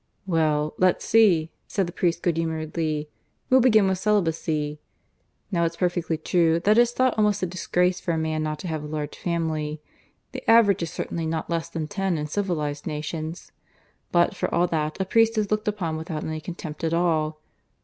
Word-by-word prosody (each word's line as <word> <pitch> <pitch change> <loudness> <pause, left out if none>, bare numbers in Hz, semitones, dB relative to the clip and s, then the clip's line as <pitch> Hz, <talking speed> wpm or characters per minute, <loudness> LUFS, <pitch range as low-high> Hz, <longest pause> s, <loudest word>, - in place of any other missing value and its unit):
"Well, 155 -4 +1
let's 185 -1 +2
see," 185 -8 +4 0.2
said 195 -3 0
the 170 - -7
priest 175 -2 0
good 170 -3 +1
humouredly. 160 -1 -2 0.4
"We'll 260 - +7
begin 220 -5 +5
with 190 -1 0
celibacy. 160 -7 0 0.7
Now 170 -3 +1
it's 165 0 0
perfectly 175 -2 -1
true 165 +1 +2
that 210 +5 +4
it's 240 0 +4
thought 255 0 +2
almost 210 -2 +2
a - - +3
disgrace 180 0 0
for 175 - -1
a 165 - 0
man 160 -1 -1
not 155 0 -2
to - - -5
have 155 -2 -3
a - - -6
large 150 -1 -4
family. 160 -3 -2 0.5
The - - -5
average 225 -5 +6
is 165 - -2
certainly 165 0 -4
not 160 +1 -3
less 165 0 -1
than 165 -2 -4
ten 195 -2 -1
in 150 - -2
civilized 150 -4 -2
nations. 155 +2 -5 0.6
But 175 0 +3
for - - -2
all 175 +1 +3
that 155 +1 -2
a 190 - 0
priest 225 +3 +3
is 210 -1 0
looked 215 +1 0
upon 180 -7 -1
without 160 -1 -5
any 155 0 -4
contempt 160 -2 -7
at 165 0 +1
all. 155 -3 +1
165 Hz, 190 wpm, -25 LUFS, 155-190 Hz, 0.7 s, We'll